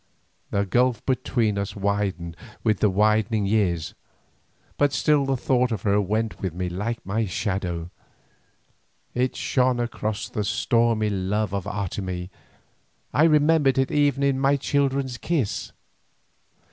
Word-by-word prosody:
The 100 0 0
gulf 120 +3 +1
between 115 -5 0
us 100 - -4
widened 100 -4 -2 0.3
with 110 -4 +2
the 105 - +4
widening 105 +2 +2
years, 95 -6 0 0.8
but 145 -1 +2
still 145 -2 +2
the 135 -1 +1
thought 125 0 +1
of 110 -5 -3
her 100 0 +3
went 110 +3 -2
with 90 -4 -3
me 90 0 -2
like 105 +6 -4
my 110 +3 -1
shadow; 90 -3 -3 1.2
it 125 +1 0
shone 130 -2 +1
across 110 -3 -3
the 105 - -3
stormy 115 -1 +1
love 100 +1 -1
of 100 -2 -2
Otomie, 95 -2 -4 0.8
I 155 - +5
remembered 150 -3 +4
it 135 0 +1
even 145 -2 +2
in 135 -1 +2
my 135 +1 +3
children's 135 -2 0
kiss. 150 -11 -1
110 Hz, 135 wpm, -24 LUFS, 100-130 Hz, 1.2 s, I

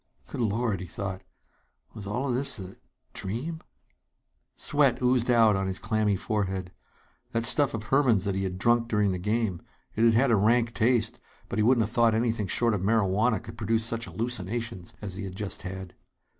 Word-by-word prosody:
Good - - -4
Lord! 110 -2 0
he 95 - -7
thought. 95 +1 -5 0.7
Was 105 -3 -8
all 125 +6 -1
this 130 +3 0
a 95 -3 -7
a - - -18 0.4
dream? 130 - -4 1.0
Sweat - - +2
oozed 125 -1 +2
out 115 -4 +5
on 95 0 -1
his 95 0 -3
clammy 105 0 0
forehead. 95 -3 -2 0.6
That 115 0 0
stuff 145 -1 +3
of 110 - -5
Herman's 120 -5 +3
that 100 - 0
he 95 - -2
had 95 -1 -3
drunk 120 +3 +2
during 105 -3 +1
the 90 - -3
game 105 -2 -1 0.3
it 110 - +1
had 115 -1 +5
had 130 +2 +3
a - - +5
rank 115 +3 +2
taste, 120 0 +2 0.3
but 115 - -2
he - - +3
wouldn't 120 -1 +4
have 110 - -7
thought 115 -2 +4
anything 110 -3 0
short 115 +4 +1
of 100 - -1
marihuana 105 +1 +2
could 115 +3 -11
produce 110 +1 0
such 115 0 -3
hallucinations 115 -3 -4
as 100 -2 -4
he 95 - -5
had 95 -1 -6
just 100 -1 -4
had. 95 0 -7
110 Hz, 190 wpm, -27 LUFS, 95-120 Hz, 1.0 s, out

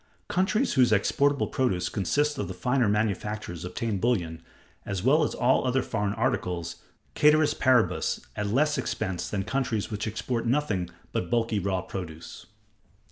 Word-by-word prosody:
Countries 205 +7 +1
whose 125 -3 +4
exportable 140 +7 +2
produce 95 -9 0
consists 145 +10 0
of - - -2
the 95 - -6
finer 125 +4 +1
manufactures 105 -4 -2
obtain 100 +3 -2
bullion, 85 -8 0 0.4
as 95 -2 -4
well 145 +6 +4
as - - -1
all 125 +2 +3
other 130 +1 +1
foreign 105 -2 -1
articles, 90 -8 -1 0.4
cæteris 150 0 +5
paribus, 130 -3 +2 0.2
at 105 - -2
less 145 +8 +2
expense 95 -5 -3
than 100 -2 -2
countries 115 -4 -2
which 105 +1 -3
export 115 +2 -2
nothing 115 -10 0 0.2
but 90 - -2
bulky 115 -3 +1
raw 95 -1 -1
produce. 85 -4 -8
110 Hz, 145 wpm, -27 LUFS, 95-130 Hz, 0.4 s, cæteris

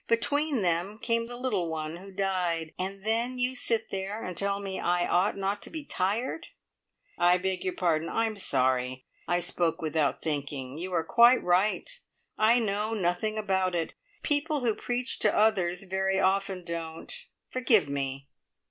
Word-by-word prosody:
Between 280 +2 +2
them 175 +4 0
came 230 0 0
the 240 0 -7
little 210 -10 -1
one 160 0 -4
who 195 +2 -11
died. 180 -4 -1
And 195 +2 -4
then 235 +3 0
you 250 +1 +1
sit 230 -3 0
there 195 +3 -3
and 185 - -5
tell 200 +1 -1
me 195 -1 -4
I 175 0 +1
ought 185 +4 +2
not 195 +1 -1
to - - -5
be 315 -3 -6
tired!" 225 - -2 0.7
"I 175 +1 +5
beg 185 0 -2
your 185 - -2
pardon. 165 -3 +1
I'm 225 -1 0
sorry. 130 -6 0 0.2
I 175 - +2
spoke 175 -1 0
without 155 -2 0
thinking. 145 -2 -3
You 185 +2 -5
are 165 -2 +1
quite 240 +5 +5
right 185 +4 +2 0.5
I 225 +3 +4
know 215 -1 0
nothing 200 +3 0
about 190 -3 0
it. 165 -2 -2 0.3
People 295 -1 0
who 235 -3 +2
preach 245 +3 -2
to 210 - +3
others 190 -4 +2
very 190 0 0
often 195 -1 +1
don't. 165 -1 -5 0.3
Forgive 245 - +3
me!" 140 -1 -3
190 Hz, 165 wpm, -28 LUFS, 170-220 Hz, 0.7 s, I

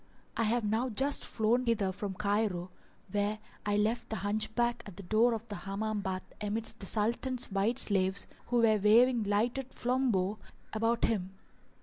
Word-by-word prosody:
I 230 - +1
have 235 +2 +1
now 220 +5 0
just 270 +5 +1
flown 235 +3 +1
hither 205 -5 +2
from 195 0 -5
Cairo, 200 -3 0 0.4
where 205 +1 0 0.3
I 205 0 +2
left 220 +3 0
the 220 - -2
Hunchback 220 +4 0
at 195 -3 -11
the 200 - -8
door 225 +5 +3
of 225 +1 -7
the 210 - -6
Hammam 210 +2 -3
bath 185 -1 -3 0.2
amidst 215 +2 -3
the 195 - -6
Sultan's 235 +4 0
white 200 +5 +1
slaves 190 -4 +2 0.2
who 245 - -1
were 215 -2 +4
waving 235 +4 +5
lighted 240 +6 0
flambeaux 235 -6 +1 0.3
about 225 +2 +1
him. 190 -4 -2
215 Hz, 160 wpm, -31 LUFS, 200-235 Hz, 0.4 s, waving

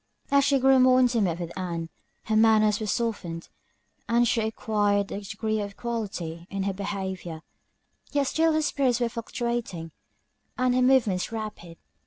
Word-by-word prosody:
As 280 0 +5
she 280 0 +3
grew 265 0 +5
more 255 0 +6
intimate 225 -9 +2
with 170 -1 -6
Ann, 170 -3 -4 0.3
her 215 - -1
manners 215 -1 +4
were 215 - -3
softened, 200 -8 -3 0.6
and 235 +1 +3
she 230 0 +1
acquired 205 -2 0
a 200 - -4
degree 215 +1 -2
of 200 -1 -5
equality 190 -8 -5
in 195 -1 -3
her 195 0 -1
behaviour: 190 -4 -5 0.7
yet 285 0 +2
still 320 +3 +2
her 310 0 +1
spirits 265 -5 +1
were 240 -1 +1
fluctuating, 230 -7 -4 0.7
and 255 -1 +2
her 255 - +2
movements 235 -8 +3
rapid. 215 -7 -6
215 Hz, 155 wpm, -26 LUFS, 190-240 Hz, 0.7 s, more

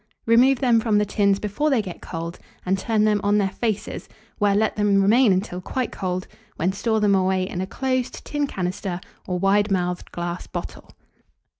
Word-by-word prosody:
Remove 250 +4 +5
them 240 -3 +4
from 220 -2 +1
the 210 - +3
tins 200 -1 +2
before 210 +9 -1
they 265 -5 +3
get 190 -5 -6
cold, 170 0 -6 0.3
and 185 +1 +2
turn 215 +2 0
them 210 -1 +2
on 205 +1 +3
their 195 -2 +1
faces, 215 0 -3 0.3
where 205 -1 +3
let 215 +1 +1
them 205 -1 +3
remain 220 +4 +5
until 185 -1 -1
quite 255 +6 -3
cold, 185 -1 -3 0.3
when 180 +4 0
store 220 +2 0
them 205 -1 +3
away 185 -1 +2
in 180 - -4
a 190 - -3
closed 255 +2 -2
tin 290 -1 -1
canister 185 -3 -3 0.3
or 180 - -1
wide 200 +3 +2
mouthed 180 -2 -1
glass 175 0 -4
bottle. - - -7
200 Hz, 185 wpm, -23 LUFS, 185-220 Hz, 0.3 s, Remove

